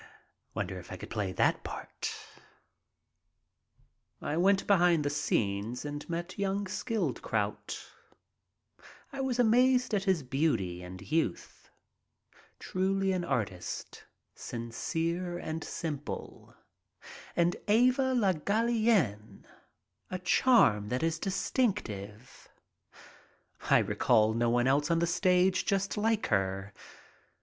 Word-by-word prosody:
Wonder - - -3
if - - -12
I - - -5
could - - -10
play 100 -3 -2
that - - +1
part? - - -5 2.1
I - - -3
went 195 +3 +4
back - - -15
behind 170 -4 +3
the 145 - +1
scenes 110 -2 -1
and 145 +2 -6
met 175 +3 -4
young 200 +1 0
Skildkraut. 220 +4 -2 1.3
I 275 - -3
was 260 -2 -1
amazed 250 +1 +4
at 200 -1 +1
his 185 -6 +2
beauty 125 - 0
and 90 +1 -9
youth. 155 - -2 0.9
Truly 195 +1 0
an 185 -2 -1
artist, 100 - -4 0.3
sincere 165 +9 -3
and 160 -1 -4
simple. 150 -4 -6 0.8
And 170 +1 +2
Eva 255 +4 +3
Le 200 -6 +3
Gallienne, 200 - 0 0.6
a 185 - -3
charm 180 - +4
that 125 +6 -1
is 165 -1 0
distinctive. 135 - -2 1.2
I - - +7
recall 110 -3 +3
no 115 +1 +1
one 120 +1 +2
else 145 +4 +2
on 170 - +3
the 170 - +2
stage 180 +2 +2
just 195 0 0
like 220 +1 +1
her. 95 0 -1
170 Hz, 110 wpm, -30 LUFS, 120-200 Hz, 2.1 s, I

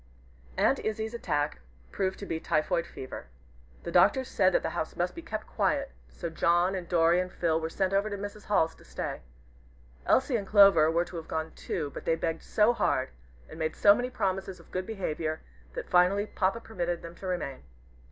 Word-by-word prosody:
Aunt - - +3
Izzie's 220 +1 -3
attack 145 -10 -1 0.3
proved 190 -1 -1
to 200 - -7
be 160 - -3
typhoid 170 +2 0
fever. 130 - -8 0.6
The - - -5
doctors 260 -1 +4
said 185 -1 +3
that - - +2
the - - -2
house 160 - -3
must 175 +1 -1
be 335 - -8
kept 325 - -5
quiet, 280 -2 0 0.2
so 170 - -6
John, 175 +3 +2
and 180 -3 -5
Dorry, 170 0 +4
and 185 0 -2
Phil 165 -2 0
were 160 - -2
sent 190 +3 -1
over 200 +2 +2
to 205 - -4
Mrs. 205 +1 -7
Hall's 165 -5 +2
to - - -18
stay. - - -5 0.9
Elsie 260 -2 +3
and 200 -3 -5
Clover 195 -7 +7
were 170 +2 +1
to 175 - -8
have 160 - -7
gone 160 0 -3
too, 150 -5 -4
but - - -8
they 165 - +3
begged 165 0 -2
so 215 +3 +3
hard, 130 - 0 0.4
and 160 - -11
made 160 0 -1
so 200 - +7
many 245 +4 -2
promises 190 -5 -2
of 170 - -18
good 185 0 -3
behavior, 160 -7 -3 0.3
that - - -5
finally 185 +3 +4
Papa 200 +2 -1
permitted 175 -6 -3
them 170 0 -8
to 190 - -8
remain. 175 -7 -3
180 Hz, 200 wpm, -29 LUFS, 165-205 Hz, 0.9 s, Clover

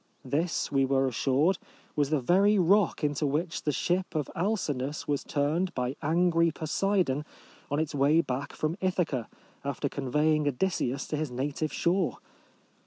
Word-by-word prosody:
This, 155 +6 -1
we 135 -1 +3
were 135 0 +2
assured, 135 +8 +2 0.4
was 145 -2 +1
the 155 -1 +2
very 195 +10 +4
rock 190 -1 +3
into 145 0 +1
which 160 +5 -1
the 150 - 0
ship 175 +5 -1
of 150 -2 -1
Alcinous 155 -8 -2
was 145 -1 0
turned 155 +6 0
by 125 +1 -1
angry 170 +2 +3
Poseidon 160 -2 0 0.5
on 145 - 0
its 155 -1 -1
way 145 +3 +4
back 135 -2 -2
from 155 +2 -1
Ithaca, 175 - 0 0.3
after 140 0 -2
convey 150 +4 +1
ing 150 -1 +1
Odysseus 140 -2 -1
to 150 - -1
his 155 -1 -2
native 140 +5 -2
shore 175 0 +1
150 Hz, 155 wpm, -28 LUFS, 140-175 Hz, 0.5 s, very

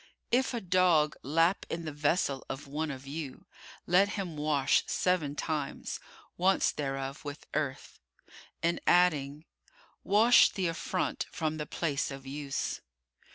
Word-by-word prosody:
"If 255 +1 +2
a 235 - -2
dog 175 -5 +3
lap 165 +6 +2
in 165 0 -4
the 155 - -3
vessel 145 -2 0
of 135 - -5
one 150 +3 -3
of 135 -1 -7
you, 140 -1 -6 0.4
let 185 +3 +4
him 180 -5 -4
wash 150 -2 +2
seven 165 -6 0
times, 150 -3 -3 0.4
once 190 +2 +3
thereof 135 0 -4
with 145 0 -7
earth," 145 -3 -3 0.6
and 170 +1 +1
adding, 155 -4 +3 0.6
"Wash 225 +4 +6
the 190 - -3
affront 170 +2 -2
from 155 -1 -2
the 150 -1 -4
place 150 -4 -1
of 135 -1 -8
use." 140 0 -3
155 Hz, 135 wpm, -30 LUFS, 140-180 Hz, 0.6 s, Wash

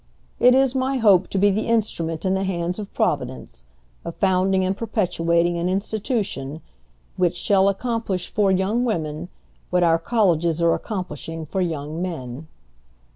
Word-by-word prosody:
"It 250 +1 +6
is 265 -1 +3
my 265 0 0
hope 200 -6 +4
to - - -3
be 205 +1 +4
the 215 +3 -1
instrument 195 -8 -1
in 190 - +2
the 190 0 0
hands 180 0 -2
of 205 - -7
Providence, 60 -2 -2 0.4
of 170 - -6
founding 190 0 +2
and 190 +1 0
perpetuating 175 -6 0
an 175 +1 0
institution 195 - -2 0.6
which 180 -1 +1
shall 195 0 +3
accomplish 200 -4 -2
for 205 -2 +2
young 190 +6 +1
women 165 -7 -2 0.4
what 180 0 +2
our 165 -1 +4
colleges 170 -6 +1
are 170 -1 +3
accomplishing 165 - -5
for 190 +5 -2
young 160 -2 -3
men." 155 -5 -5
185 Hz, 150 wpm, -22 LUFS, 165-205 Hz, 0.6 s, It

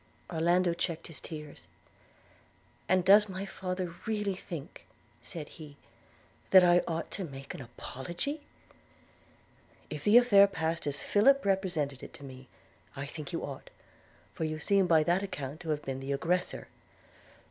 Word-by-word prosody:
Orlando 175 +2 +2
checked 170 -1 -3
his 165 - -5
tears: 150 - -9 1.2
'And 185 -1 +3
does 205 +2 +7
my 190 +1 -4
father 185 -2 -4
really 210 -3 0
think,' 170 -5 -9 0.3
said 150 +4 -6
he, 150 -3 -12 0.7
'that 185 -1 +8
I 175 0 +6
ought 165 -1 -3
to 195 - -3
make 135 -4 -8
an - - -8
apology?' 170 - -5 1.5
'If 150 -1 -5
the 210 +3 +7
affair 205 -5 +7
passed 165 -4 -2
as 145 - -2
Philip 275 +6 +4
represented 175 -9 0
it - - -10
to - - -13
me, 130 -1 -10 0.5
I 140 0 -4
think 150 +2 -7
you 165 - -3
ought; 135 -2 -7 0.6
for - - -4
you 155 0 -2
seem 195 +4 +2
by 160 -2 +5
that 175 +4 +2
account 150 -7 -5
to 170 -2 -7
have 150 -1 -1
been 135 -1 -4
the 135 +1 -3
aggressor.' 175 +6 -1
170 Hz, 150 wpm, -30 LUFS, 145-190 Hz, 1.5 s, that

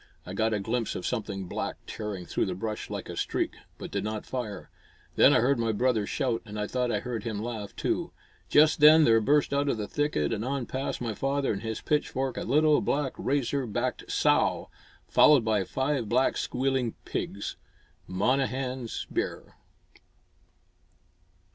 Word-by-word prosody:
I 90 - -7
got 110 +3 +1
a 105 - 0
glimpse 115 +3 -2
of 90 - -5
something 100 -5 -3
black - - -3
tearing 105 -4 -5
through - - -1
the 90 - -3
brush 105 +3 -4
like - - -5
a - - -6
streak, - - -1 0.2
but - - -8
did 100 -1 -2
not 110 0 -4
fire. 120 -6 -5 0.4
Then - - +7
I - - +4
heard 130 +1 +2
my 115 -1 +1
brother 110 -1 +1
shout, 125 -6 -1
and 105 -2 -7
I 105 - 0
thought 125 +2 -1
I - - 0
heard 120 -4 -4
him 110 -3 -3
laugh, 110 -2 -5
too. - - -1 0.4
Just 155 +1 +5
then 155 +2 +8
there 115 -4 +5
burst 145 +5 +2
out 140 0 +1
of 120 - 0
the 105 -1 -3
thicket 145 - 0
and 110 -1 -2
on 135 0 -2
past 130 +1 -3
my 115 -2 -2
father 135 +3 0
and 100 - -5
his 110 -1 -4
pitchfork 135 -3 -1
a - - -2
little 150 +4 +4
black, 140 -2 0
razor 140 -1 -1
backed 120 +4 -3
sow, - - +2 0.4
followed 145 -6 +6
by 110 -3 +2
five 130 +5 -1
black, 130 +3 +2
squealing 130 -2 -1
pigs! - - -4 0.5
Monnehan's 130 +4 -1
bear! - - -3
120 Hz, 175 wpm, -28 LUFS, 105-135 Hz, 0.5 s, then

